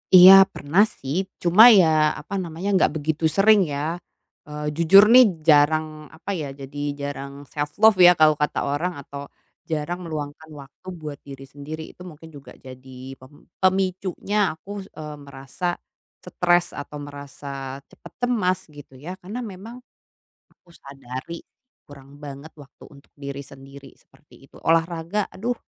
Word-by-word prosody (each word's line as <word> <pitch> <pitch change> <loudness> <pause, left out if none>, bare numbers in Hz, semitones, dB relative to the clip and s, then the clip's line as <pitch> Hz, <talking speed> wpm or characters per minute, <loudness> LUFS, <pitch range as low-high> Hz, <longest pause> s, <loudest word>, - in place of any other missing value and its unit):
Iya, 185 +1 +11 0.2
pernah 165 +8 +2 0.2
sih, 135 +2 -5 0.3
cuma 180 +5 +6 0.2
ya 175 - +5 0.3
apa - - -11
namanya, 170 +3 -7
nggak 190 - +3
begitu 155 +1 -3
sering 210 +1 +5
ya. 140 - -3 0.7
Eee, 150 0 -7
jujur 170 +4 +7
nih 255 +1 +9 0.2
jarang 155 +1 +4 0.3
apa 165 - -11
ya, 145 - -5
jadi 140 +1 -10 0.2
jarang 140 -1 -6 0.2
self-love 175 +9 +2
ya, - - +9
kalau 155 -1 +5
kata 150 - 0
orang 170 +6 -2
atau, 140 +1 -9 0.5
jarang 160 +3 -3
meluangkan 155 -1 -7
waktu 140 +6 -19
buat 150 -2 -7
diri 135 -1 -11
sendiri 150 +3 -8
itu - - -18
mungkin 160 0 -14
juga 140 - -13
jadi 130 0 -11
pem 135 +3 -18 0.2
pemicunya 190 +1 -1 0.2
aku 190 - -20
s - - -15
eee, 150 -1 -7
merasa 135 +4 -9 0.6
stres 175 -1 +1 0.2
atau 150 - -10
merasa 140 -1 -8
cepat - - -16
cemas 185 -7 0 0.2
gitu 145 -2 -14
ya 175 +7 -8
karena 205 +7 -7
memang, 220 +6 -11 0.7
aku 175 - -30
sadari 135 +4 -9 0.5
kurang 140 -1 -15
banget 140 +2 -9
waktu 140 -1 -16
untuk 140 0 -19
diri 140 -1 -7
sendiri 135 0 -14
seperti 150 - -27
itu. 135 - -21
Olahraga, 165 +3 0
aduh 240 +5 -3
150 Hz, 145 wpm, -22 LUFS, 140-180 Hz, 0.7 s, Iya